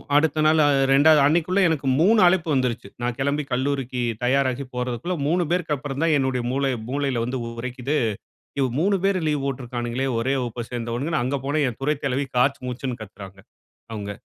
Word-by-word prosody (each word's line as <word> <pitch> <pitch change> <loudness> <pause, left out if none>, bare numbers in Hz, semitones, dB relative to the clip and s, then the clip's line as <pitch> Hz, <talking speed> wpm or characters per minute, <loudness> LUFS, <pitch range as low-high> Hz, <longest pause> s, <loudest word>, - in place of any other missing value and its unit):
அடுத்த 155 +1 +3
நாள் 155 +1 +4
அ - - +4 0.2
2வது 150 +3 +6
அன்னைக்குள்ள 170 +5 +2
எனக்கு 145 -4 -1
3 215 +6 +5
அழைப்பு 175 -2 +2
வந்துருச்சி. 125 -6 -1
நான் 120 0 -2
கிளம்பி 140 +2 0
கல்லூரிக்கு 130 -1 -1 0.2
தயாராகி 130 +1 +1
போறதுக்குள்ள 125 +8 -2
3 175 +3 +2
பேருக்கு 175 -4 0
அப்புறம் 140 +1 -5
தான் 165 -2 +3
என்னுடைய 130 -2 0
மூள 135 +2 -1 0.3
மூளையில 135 -3 -1
வந்து 125 +2 -3 0.2
உரைக்குது. 130 +4 -2 0.6
யோ 135 - +3
3 200 +5 +2
பேர் 195 -1 +2
லீவ் 150 -2 0
போட்டிருக்கானுங்குளே 125 -1 -3
ஒரே 130 +4 0
வகுப்ப 120 -1 -4
சேர்ந்தவங்கனு 120 +6 -2
அங்க 130 +3 -1
போன 145 +2 0
என் 115 - -10
துறை 150 +3 +1
தலைவி 135 +1 0
காச்சு 135 +3 +2
மூச்சுன் 125 0 -4
கத்துறாங்க 95 -2 -11 0.5
அவங்க. 105 -2 -5
135 Hz, 170 wpm, -23 LUFS, 125-150 Hz, 0.6 s, 2வது